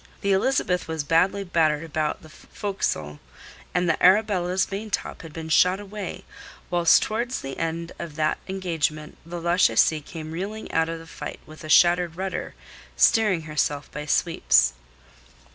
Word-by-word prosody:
The 200 - +1
Elizabeth 190 -3 +1
was 160 -2 -3
badly 180 +6 +2
battered 160 -4 +1
about 155 -1 -2
the 155 - -13
forecastle, 80 - -4 0.5
and 180 0 0
the 165 - 0
Arabella's 185 -2 +3
maintop 205 +1 -4
had 165 - -10
been 160 +1 -7
shot 180 +4 +4
away, 205 -1 -7 0.5
whilst' 175 -1 +5
towards 235 +4 -2
the 135 0 -6
end 165 +1 -3
of 165 -3 -7
that 155 -1 0
engagement 165 -5 -3
the 175 +1 -5
Lachesis 170 -2 +3
came 155 +1 -8
reeling 200 +6 -5
out 160 0 +1
of 165 - -4
the 165 - -11
fight 165 - -8
with 155 +2 -13
a 155 - -8
shattered 175 0 +4
rudder, 190 +1 -4 0.4
steering 210 -7 +4
herself 150 -2 -2
by 150 0 -6
sweeps. 165 - +3
170 Hz, 150 wpm, -24 LUFS, 155-190 Hz, 0.5 s, whilst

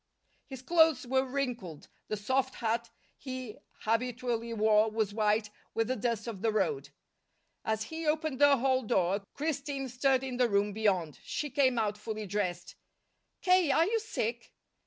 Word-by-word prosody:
His 265 -2 -9
clothes 320 -4 +4
were 260 +1 +2
wrinkled; 250 - -4 0.2
the 215 - -2
soft 260 +5 0
hat 230 0 -1 0.3
he 255 -4 -6 0.2
habitually 235 0 -1
wore 215 0 +3
was 215 -2 -1
white 210 0 +1 0.2
with 225 +1 0
the 255 - +1
dust 230 -1 -1
of 220 -5 -6
the 225 0 +2
road. 405 - 0 0.7
As 220 0 -1
he 320 +6 -5
opened 305 -3 0
the 285 -1 +7
hall 260 +1 +2
door, 200 -4 +1
Christine 280 -2 -2
stirred 260 +1 +2
in 255 -2 -4
the 245 -1 +3
room 200 0 +1
beyond. 190 -8 0
She 295 -2 -4
came 260 -2 +3
out 210 -2 0
fully 215 0 -5
dressed. 185 -3 -3 0.7
"K., 365 -4 +4
are 320 +4 +4
you 450 +4 +1
sick?" 235 - -4
240 Hz, 155 wpm, -31 LUFS, 215-270 Hz, 0.7 s, the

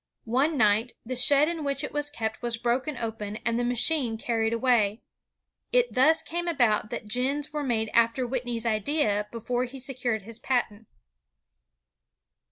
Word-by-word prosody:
One 270 +7 +1
night, 220 +1 +2
the 255 +2 -4
shed 280 +4 +6
in 330 -2 -2
which 280 0 -2
it - - -4
was 295 0 -1
kept 220 -6 -4
was 240 -1 -1
broken 255 +5 -1
open 220 -3 -5
and 230 +1 +1
the - - 0
machine 245 0 +1
carried 225 -1 -1
away. 230 -3 +1 0.7
It - - +2
thus 305 +5 +4
came 345 +1 -4
about 240 -10 +2
that 210 - -6
gins 275 +6 -1
were 300 - -2
made 225 -5 -1
after 235 +2 +2
Whitney's 240 -2 -3
idea 215 -2 0
before 245 +2 -2
he 260 +2 -10
secured 250 -5 -2
his 230 +2 0
patent. 225 -4 -2
245 Hz, 160 wpm, -26 LUFS, 225-275 Hz, 0.7 s, shed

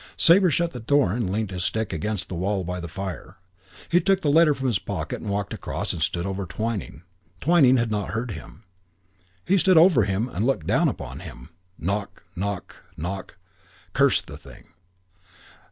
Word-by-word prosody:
Sabre 180 +2 +6
shut 170 +3 +1
the 125 - -7
door 120 -5 +2
and 115 -5 -1
leant 105 0 -2
his 90 -1 -3
stick 110 +1 -1
against 95 +4 -2
the - - -7
wall 95 +3 -1
by 90 +1 -4
the 85 - -6
fire. 95 +1 -7 0.5
He 175 +1 +3
took 195 -1 +2
the 145 - +2
letter 155 -1 +5
from 135 - -5
his 120 -7 +1
pocket - - -4
and - - -5
walked 100 0 -2
across - - -3
and 80 - -6
stood 85 +3 0
over 95 -1 -3
Twyning. 105 -5 -4 0.4
Twyning 140 - +5
had 115 -2 0
not 105 -4 -2
heard 115 +5 -3
him. 80 - -10 0.8
He 195 +1 +3
stood 185 +1 +5
over 160 - +6
him 100 +4 -1
and 105 -4 -3
looked 125 - 0
down - - +3
upon - - -5
him. - - -10 0.3
Knock, 100 +1 -3
knock, 100 0 -4 0.2
knock. 95 +3 -5 0.6
Curse - - +4
the - - -11
thing. - - -15
105 Hz, 185 wpm, -24 LUFS, 95-130 Hz, 0.8 s, Sabre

